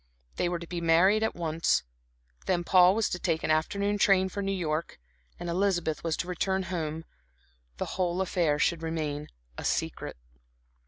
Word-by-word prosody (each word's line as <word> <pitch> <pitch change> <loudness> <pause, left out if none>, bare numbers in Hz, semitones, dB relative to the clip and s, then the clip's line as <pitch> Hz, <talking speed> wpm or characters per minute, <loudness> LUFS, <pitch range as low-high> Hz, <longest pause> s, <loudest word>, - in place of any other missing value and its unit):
They 175 - +1
were 175 - -1
to 170 - -8
be 170 0 -5
married 175 +6 +4
at 220 - 0
once. 165 - +1 0.6
Then 175 -2 +1
Paul 180 +1 +6
was 225 -1 +2
to 180 - -3
take 165 -3 -1
an - - +1
afternoon 200 +6 0
train 190 -1 +4
for 200 - -4
New 195 0 -1
York, 165 - -2 0.4
Elizabeth 175 -2 0
was 165 -2 -1
to - - -3
return 190 +2 -1
home, 160 -1 -3 0.7
the - - -2
whole 180 -1 -1
affair 175 -5 +1
should 165 +2 +1
remain 155 -2 -3 0.3
a - - -6
secret. - - -2
175 Hz, 165 wpm, -28 LUFS, 160-190 Hz, 0.7 s, Paul